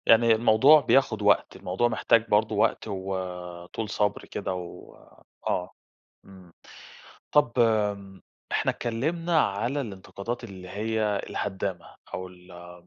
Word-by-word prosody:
يعني 115 Hz, 0 st, +6 dB
الموضوع 120 Hz, +7 st, +6 dB
بياخد 125 Hz, -7 st, +2 dB
وقت، 105 Hz, 0 st, +3 dB
الموضوع 95 Hz, +5 st, 0 dB
محتاج 115 Hz, 0 st, +2 dB
برضو 105 Hz, +1 st, +2 dB
وقت، -, -, +1 dB
وطول 95 Hz, 0 st, -5 dB
صبر 105 Hz, -1 st, -1 dB
كده -, -, -4 dB
وآه. 90 Hz, 0 st, -7 dB, 0.5 s
امم، 95 Hz, -3 st, -16 dB, 0.8 s
طَب 145 Hz, -4 st, +4 dB
آمم 105 Hz, -4 st, +1 dB, 0.3 s
إحنا -, -, +1 dB
اتكلمنا 160 Hz, +8 st, -1 dB
على 120 Hz, +8 st, -1 dB
الانتقادات 105 Hz, +1 st, -6 dB
اللي 95 Hz, -4 st, -10 dB
هي 105 Hz, +1 st, -1 dB
الهدامة، 95 Hz, -4 st, -4 dB, 0.2 s
أو 95 Hz, -, -4 dB
ال 90 Hz, -1 st, -13 dB
105 Hz, 110 wpm, -26 LUFS, 95-115 Hz, 0.8 s, يعني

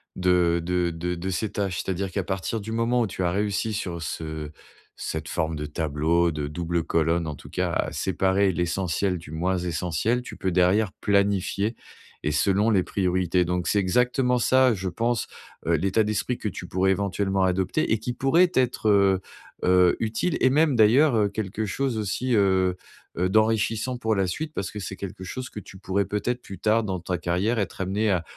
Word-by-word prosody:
de 90 Hz, -2 st, +2 dB
de 90 Hz, 0 st, 0 dB
de 85 Hz, +1 st, -3 dB
de 90 Hz, +2 st, -4 dB
ces 95 Hz, +3 st, -2 dB
tâches, 95 Hz, -3 st, -2 dB
c'est-à-dire 95 Hz, 0 st, -2 dB
qu'à 100 Hz, 0 st, -1 dB
partir 95 Hz, +4 st, -3 dB
du 110 Hz, +2 st, -6 dB
moment 115 Hz, +2 st, +1 dB
où -, -, +2 dB
tu 95 Hz, -, -6 dB
as 90 Hz, -, +2 dB
réussi 105 Hz, +3 st, -1 dB
sur 90 Hz, -5 st, -4 dB
ce 80 Hz, -1 st, -5 dB, 0.5 s
cette 80 Hz, 0 st, -5 dB
forme 80 Hz, -1 st, -1 dB
de 75 Hz, -1 st, -4 dB
tableau, 80 Hz, +3 st, +1 dB
de 75 Hz, -2 st, -3 dB
double 85 Hz, +2 st, -2 dB
colonne, 85 Hz, +1 st, +1 dB
en 75 Hz, -, -4 dB
tout -, -, -13 dB
cas, -, -, -1 dB
à -, -, -1 dB
séparer 95 Hz, +1 st, +1 dB
l'essentiel 90 Hz, +1 st, -1 dB
du 80 Hz, -, -13 dB
moins 90 Hz, +4 st, -1 dB
essentiel, 90 Hz, +8 st, -1 dB
tu -, -, -9 dB
peux 95 Hz, -, -2 dB
derrière 95 Hz, +4 st, +3 dB
planifier 100 Hz, +2 st, +1 dB, 0.5 s
et 75 Hz, -, 0 dB
selon 100 Hz, +8 st, +2 dB
les 100 Hz, -5 st, +3 dB
priorités. 90 Hz, -2 st, +1 dB
Donc, 90 Hz, 0 st, -1 dB
c'est 105 Hz, -, +2 dB
exactement 125 Hz, +6 st, +2 dB
ça, 130 Hz, 0 st, +4 dB
je 95 Hz, -1 st, -3 dB
pense, 115 Hz, +5 st, -1 dB, 0.4 s
heu, 85 Hz, -, +2 dB
l'état 95 Hz, +7 st, +2 dB
d'esprit 110 Hz, +3 st, -1 dB
que 105 Hz, -, -3 dB
tu 90 Hz, -1 st, -8 dB
pourrais 95 Hz, +2 st, +1 dB
éventuellement 95 Hz, 0 st, 0 dB
adopter 95 Hz, 0 st, 0 dB
et 110 Hz, -, +4 dB
qui 120 Hz, +3 st, -3 dB
pourrait 135 Hz, +9 st, +4 dB
t'être, 130 Hz, -9 st, 0 dB
heu 100 Hz, -2 st, +4 dB, 0.4 s
heu, 90 Hz, -1 st, +5 dB
utile 115 Hz, +10 st, -1 dB
et 130 Hz, -, +4 dB
même 150 Hz, +1 st, +3 dB
d'ailleurs, 120 Hz, +6 st, +5 dB
heu, 105 Hz, -2 st, +2 dB
quelque 105 Hz, +1 st, -3 dB
chose 130 Hz, +3 st, -1 dB
aussi, 110 Hz, +5 st, -1 dB
heu 95 Hz, -3 st, +3 dB, 0.4 s
heu, 90 Hz, +2 st, +2 dB
d'enrichissant 110 Hz, +3 st, +1 dB
pour 110 Hz, -2 st, 0 dB
la 95 Hz, -1 st, +1 dB
suite 155 Hz, -, -4 dB
parce 100 Hz, -7 st, -3 dB
que 105 Hz, -, -6 dB
c'est 95 Hz, -1 st, -5 dB
quelque 95 Hz, -1 st, -7 dB
chose 130 Hz, +8 st, -6 dB
que -, -, -6 dB
tu 95 Hz, -, -12 dB
pourrais 100 Hz, +1 st, -1 dB
peut-être 120 Hz, +4 st, -2 dB
plus 95 Hz, -, -9 dB
tard 110 Hz, +2 st, +2 dB
dans 95 Hz, -3 st, -3 dB
ta 90 Hz, +1 st, -3 dB
carrière 90 Hz, +7 st, 0 dB
être 95 Hz, -2 st, -3 dB
amené 100 Hz, +4 st, 0 dB
à 90 Hz, -3 st, +1 dB
95 Hz, 195 wpm, -25 LUFS, 90-110 Hz, 0.5 s, heu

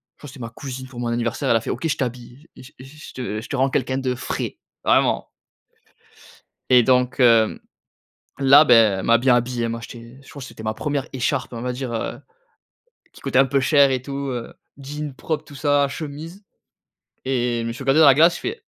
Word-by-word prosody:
je -, -, -67 dB
crois 145 Hz, -, -11 dB
c'est 135 Hz, -, -13 dB
ma 115 Hz, -1 st, -6 dB
cousine 130 Hz, 0 st, -8 dB
pour 125 Hz, -2 st, -10 dB
mon 120 Hz, -, -2 dB
anniversaire 120 Hz, 0 st, -2 dB
elle -, -, +4 dB
a 115 Hz, -, +2 dB
fait: -, -, -7 dB
«OK 165 Hz, -, -2 dB
je 155 Hz, 0 st, -1 dB
t'habille. 125 Hz, +3 st, -6 dB
Je 130 Hz, -, -14 dB
je 130 Hz, -, -11 dB
je 150 Hz, +3 st, -13 dB
te 110 Hz, -4 st, -4 dB
je -, -, -10 dB
te 140 Hz, -, -3 dB
rends 135 Hz, +1 st, +2 dB
quelqu'un 130 Hz, 0 st, -1 dB
de 130 Hz, -1 st, -2 dB
frais, -, -, -4 dB, 0.3 s
vraiment!» -, -, +2 dB, 1.4 s
Et 125 Hz, -2 st, +6 dB
donc 125 Hz, +1 st, +1 dB
heu, 115 Hz, -3 st, +4 dB, 0.8 s
là 140 Hz, +2 st, +7 dB
ben, 115 Hz, -7 st, +5 dB
elle -, -, -6 dB
m'a 115 Hz, 0 st, +4 dB
bien 125 Hz, +1 st, +3 dB
habillé. 120 Hz, 0 st, -1 dB
Elle 115 Hz, -, -1 dB
m'a 115 Hz, -, -4 dB
acheté, 115 Hz, +2 st, -11 dB
je -, -, -16 dB
crois 140 Hz, -, -10 dB
que -, -, -7 dB
c'était -, -, -11 dB
ma 110 Hz, 0 st, -2 dB
1re 145 Hz, -1 st, -3 dB
écharpe. 130 Hz, 0 st, -2 dB
On 115 Hz, -, -6 dB
va 125 Hz, 0 st, -2 dB
dire, 125 Hz, -1 st, -5 dB
heu, 115 Hz, -, -4 dB, 0.9 s
qui -, -, -16 dB
coûtait 135 Hz, -2 st, +1 dB
un 135 Hz, -, +6 dB
peu 135 Hz, +1 st, +1 dB
cher 140 Hz, +1 st, +4 dB
et 130 Hz, -, -1 dB
tout. 135 Hz, +2 st, -7 dB, 0.2 s
Heu, 120 Hz, -2 st, -6 dB, 0.2 s
jean, 145 Hz, +1 st, -6 dB
propre 155 Hz, +3 st, -4 dB
tout 145 Hz, -, -14 dB
ça, 145 Hz, 0 st, +2 dB
chemise 155 Hz, +6 st, -8 dB, 0.8 s
et 125 Hz, -2 st, 0 dB
je 115 Hz, -, -4 dB
me -, -, -3 dB
suis 120 Hz, +4 st, -8 dB
regardé 135 Hz, +4 st, +3 dB
dans 155 Hz, -, +8 dB
la 140 Hz, -, +8 dB
glace, 165 Hz, +4 st, +5 dB
j'ai -, -, -8 dB
fait: 435 Hz, +3 st, -5 dB
130 Hz, 225 wpm, -22 LUFS, 120-140 Hz, 1.4 s, dans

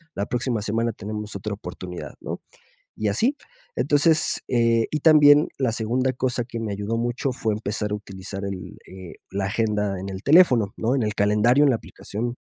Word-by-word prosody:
la 100 Hz, -, -1 dB
próxima 120 Hz, -2 st, -1 dB
semana 115 Hz, +3 st, 0 dB
tenemos 105 Hz, 0 st, -6 dB
otra 105 Hz, +1 st, -4 dB
oportunidad, 90 Hz, -2 st, -8 dB
¿no? -, -, -6 dB, 0.6 s
Y 110 Hz, -1 st, -1 dB
así. 240 Hz, -, +1 dB, 0.4 s
Entonces, 155 Hz, +2 st, +2 dB
eh, 115 Hz, -2 st, +2 dB
y 155 Hz, -, -2 dB
también 150 Hz, -1 st, +6 dB
la 130 Hz, -4 st, +1 dB
segunda 125 Hz, +4 st, 0 dB
cosa 125 Hz, -1 st, -1 dB
que 115 Hz, -1 st, -6 dB
me 110 Hz, -2 st, -3 dB
ayudó 105 Hz, +3 st, -2 dB
mucho 120 Hz, +3 st, -1 dB
fue 110 Hz, -3 st, -1 dB
empezar 105 Hz, 0 st, -3 dB
a -, -, +1 dB
utilizar 100 Hz, -1 st, -7 dB
el 95 Hz, -2 st, -6 dB
eh, 95 Hz, -2 st, -10 dB, 0.2 s
la 95 Hz, 0 st, -2 dB
agenda 105 Hz, -2 st, -1 dB
en 95 Hz, +1 st, -6 dB
el 95 Hz, +1 st, -7 dB
teléfono, 130 Hz, -, +5 dB
¿no? 120 Hz, +4 st, 0 dB
En 130 Hz, -, +1 dB
el 105 Hz, -1 st, -1 dB
calendario, 105 Hz, +8 st, +3 dB
en 140 Hz, -, +5 dB
la 120 Hz, -, +2 dB
aplicación. 120 Hz, +2 st, -6 dB
110 Hz, 185 wpm, -24 LUFS, 100-125 Hz, 0.6 s, también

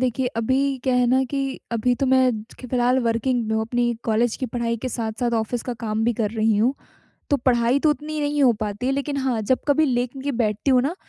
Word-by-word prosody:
देखिए 255 Hz, 0 st, 0 dB
अभी 265 Hz, +4 st, +1 dB
क्या 260 Hz, -, +2 dB
है 250 Hz, -1 st, +3 dB
ना 260 Hz, +2 st, +3 dB
कि 275 Hz, -1 st, -2 dB
अभी 235 Hz, +2 st, +1 dB
तो 270 Hz, +2 st, -1 dB
मैं 260 Hz, -1 st, +4 dB, 0.3 s
फिलहाल 250 Hz, 0 st, +1 dB
वर्किंग 235 Hz, +1 st, 0 dB
में 220 Hz, -, 0 dB
हूँ, 220 Hz, -, +1 dB
अपनी 240 Hz, +1 st, 0 dB
कॉलेज 230 Hz, +1 st, +1 dB
की 260 Hz, -, -3 dB
पढ़ाई 235 Hz, 0 st, -2 dB
के -, -, 0 dB
साथ-साथ 235 Hz, +1 st, -2 dB
ऑफ़िस 230 Hz, +2 st, -3 dB
का 245 Hz, -, -4 dB
काम 215 Hz, +1 st, -1 dB
भी 235 Hz, -, +2 dB
कर 210 Hz, -, 0 dB
रही 220 Hz, -1 st, +1 dB
हूँ। 240 Hz, +6 st, +2 dB, 0.6 s
तो 285 Hz, -, +4 dB
पढ़ाई 245 Hz, 0 st, +2 dB
तो 310 Hz, -, +3 dB
उतनी 305 Hz, +1 st, -3 dB
नहीं 290 Hz, 0 st, 0 dB
हो 255 Hz, -3 st, +6 dB
पाती 210 Hz, +3 st, -3 dB
है, 265 Hz, -, +2 dB
लेक़िन 280 Hz, +1 st, -2 dB
हाँ, 260 Hz, -5 st, 0 dB
जब 255 Hz, +5 st, +2 dB
कभी 310 Hz, +2 st, +4 dB
लेके 260 Hz, +2 st, -2 dB
बैठती 215 Hz, +4 st, 0 dB
हूँ 255 Hz, -1 st, +4 dB
ना, 290 Hz, +6 st, -1 dB
250 Hz, 225 wpm, -23 LUFS, 230-265 Hz, 0.6 s, हो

